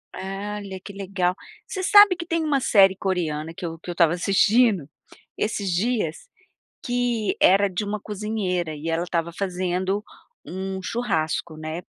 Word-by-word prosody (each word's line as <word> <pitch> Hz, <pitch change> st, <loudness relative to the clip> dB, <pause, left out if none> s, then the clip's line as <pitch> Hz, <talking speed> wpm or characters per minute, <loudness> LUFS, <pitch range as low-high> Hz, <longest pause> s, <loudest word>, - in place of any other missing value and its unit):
E -, -, -7 dB, 0.4 s
olha, 195 Hz, -2 st, -7 dB
que 200 Hz, -, -10 dB
legal. 190 Hz, -2 st, -1 dB, 0.3 s
Você 380 Hz, -1 st, -4 dB
sabe 410 Hz, -1 st, +7 dB
que 340 Hz, -1 st, -6 dB
tem 330 Hz, -1 st, -1 dB
uma 290 Hz, -3 st, +2 dB
série 195 Hz, -6 st, +5 dB
coreana 165 Hz, -5 st, -2 dB
que 180 Hz, -, -6 dB
eu 165 Hz, 0 st, -5 dB
que 175 Hz, -, -10 dB
eu -, -, -2 dB
estava 170 Hz, -1 st, +3 dB
assistindo 195 Hz, -, +3 dB, 0.5 s
esses 205 Hz, -2 st, -1 dB
dias, 225 Hz, +6 st, 0 dB, 0.7 s
que 245 Hz, -3 st, 0 dB
era 200 Hz, +2 st, +5 dB
de 185 Hz, +3 st, -3 dB
uma 205 Hz, 0 st, -3 dB
cozinheira, 195 Hz, -6 st, -2 dB
e 155 Hz, +3 st, -6 dB
ela 170 Hz, +2 st, -1 dB
tava 170 Hz, -1 st, -2 dB
fazendo 185 Hz, +1 st, -1 dB, 0.4 s
um 190 Hz, +1 st, -5 dB
churrasco, 170 Hz, -8 st, -2 dB
né, 155 Hz, +2 st, -5 dB
190 Hz, 155 wpm, -24 LUFS, 175-215 Hz, 0.7 s, sabe